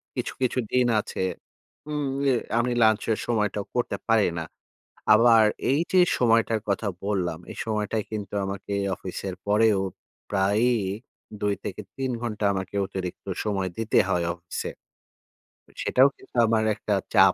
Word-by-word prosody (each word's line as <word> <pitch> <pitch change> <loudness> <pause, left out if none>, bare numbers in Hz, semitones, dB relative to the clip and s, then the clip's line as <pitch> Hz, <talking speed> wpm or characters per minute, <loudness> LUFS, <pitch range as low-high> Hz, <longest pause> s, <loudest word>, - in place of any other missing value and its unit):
কিছু, - - -3
কিছু 130 0 +1
দিন 125 -1 +3
আছে - - -8 0.7
হুম, 150 -1 -2 0.2
এ - - +5 0.3
আমি 125 +1 +1
lunch 110 -1 +4
এর 110 - +1
সময়টাও 105 -3 0
করতে 120 - 0
পারি 115 -2 +5
না। 80 - -4 0.7
আবার 115 0 +6 0.3
এই 140 - +3
যে, 185 - +5 0.2
সময়টার 115 -2 +3
কথা 100 +2 0 0.2
বললাম, 90 -6 -1
এই - - -10
সময়টায় 105 0 -1
কিন্তু 105 -2 -5
আমাকে 100 +1 -5 0.2
অফিসের 95 0 -5
পরেও 105 -1 +4 0.5
প্রায়ই 105 +4 +2 0.6
২ 105 0 +2
থেকে - - -5
৩ 130 -1 -2
ঘন্টা 110 -3 -2
আমাকে 95 0 -4
অতিরিক্ত 90 -2 -6 0.2
সময় 95 -3 -1
দিতে 115 0 +1
হয় 90 -2 +1
অফিসে। 85 0 -5 1.1
সেটাও 130 +2 +5
কিন্তু - - -20
আমার 110 -1 +2
একটা 105 -1 -2 0.2
চাপ - - +7
105 Hz, 140 wpm, -26 LUFS, 100-115 Hz, 1.1 s, চাপ